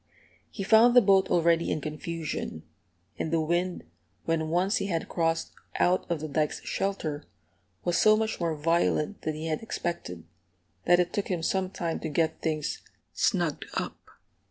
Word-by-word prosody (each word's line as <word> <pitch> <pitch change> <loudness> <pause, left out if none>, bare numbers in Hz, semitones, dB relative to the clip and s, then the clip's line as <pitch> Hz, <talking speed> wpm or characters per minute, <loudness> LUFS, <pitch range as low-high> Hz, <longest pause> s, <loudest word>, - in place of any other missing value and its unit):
He 195 - -5
found 225 +4 +6
the - - +11
boat 195 -2 +4
already 170 -1 +3
in - - 0
confusion; 155 - -5 0.6
and 160 - -2
the 165 - +2
wind, 175 +3 -1 0.4
when 160 -1 0
once 185 +7 +2
he 195 - -2
had 165 -4 -2
crossed 165 -1 0 0.2
out 180 +1 +2
of 170 -3 -1
the 155 - -3
dike's 150 +1 -1
shelter, 160 -7 -2 0.6
was 175 -1 +1
so 215 0 +6
much 220 0 -1
more 165 -2 0
violent 165 +3 +1
than 155 - -2
he 155 +1 -5
had 155 -1 -2
expected, 170 - -4 0.6
that 175 0 +5
it 175 -1 +1
took 205 - -1
him 175 -3 -2
some 190 +2 0
time 170 -3 -3
to 160 - -4
get 160 +1 0
things 155 -2 -2 0.3
"snugged - - 0
up." - - -3
170 Hz, 165 wpm, -28 LUFS, 155-190 Hz, 0.6 s, the